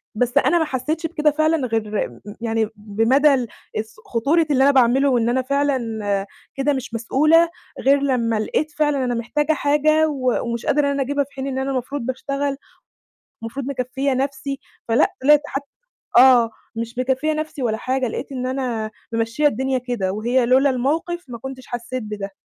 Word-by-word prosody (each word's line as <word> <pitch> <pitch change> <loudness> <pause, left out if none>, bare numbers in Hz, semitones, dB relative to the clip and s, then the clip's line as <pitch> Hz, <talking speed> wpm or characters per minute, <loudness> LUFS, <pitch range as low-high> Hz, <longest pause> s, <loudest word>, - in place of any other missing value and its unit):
بس 245 +4 0
أنا 340 +4 +4
ما 320 - +1
حسّيتش 305 +5 -2
بكده 300 -2 +1
فعلًا 310 -3 +1
غير 215 - -1
م 120 - -16 0.2
يعني 225 -2 0
بمدى 225 +8 +3
ال 250 -3 0 0.3
الس 220 +1 -4
خطورة 300 +8 +1
اللي 265 -1 +4
أنا 280 - +6
باعمله 265 +1 +4
وإن 235 -2 +2
أنا 260 +2 +1
فعلًا 280 0 +1 0.8
كده 275 +1 +1
مش 255 -3 -5
مسؤولة 310 +9 +3 0.3
غير 275 +1 +4
لمّا 235 -5 +1
لقيت 305 +8 -1
فعلًا 295 -3 +1
أنا 245 -1 -1
محتاجة 295 +7 0
حاجة 305 +2 +3
و 255 -4 0
ومش 235 -1 -4
قادرة 290 0 +2
إن - - +1
أنا 280 0 -1
أجيبها 285 +2 0
في 280 - -17
حين 270 0 -5
إن 265 -1 -3
أنا 270 +1 -1
المفروض 265 +2 -3
باشتغل، 275 +3 -2 0.9
المفروض 250 +4 -5
مكفّية 265 0 -1
نَفْسي، 275 +1 -2 0.3
فلأ 230 +1 +3
طلِعت 295 +2 +6
حتّى 275 0 -4 0.5
آه، 245 -3 +7 0.3
مش 230 +2 -5
مكفّية 265 +4 +1
نَفْسي 310 -3 -4
ولا 220 -2 0
حاجة 255 +1 -1
لقيت 275 +5 -5
إن 255 -1 -3
أنا 245 -5 -2 0.2
مِمشّية 230 +6 0
الدنيا 265 0 +1
كده، 240 -7 -2
وهي 240 +4 +1
لولا 265 +3 +4
الموقِف 320 +7 -1
ما 235 -2 -7
كنتش 260 +1 -8
حسّيت 240 +1 -5
بده. 210 -2 -5
265 Hz, 175 wpm, -21 LUFS, 235-285 Hz, 0.9 s, آه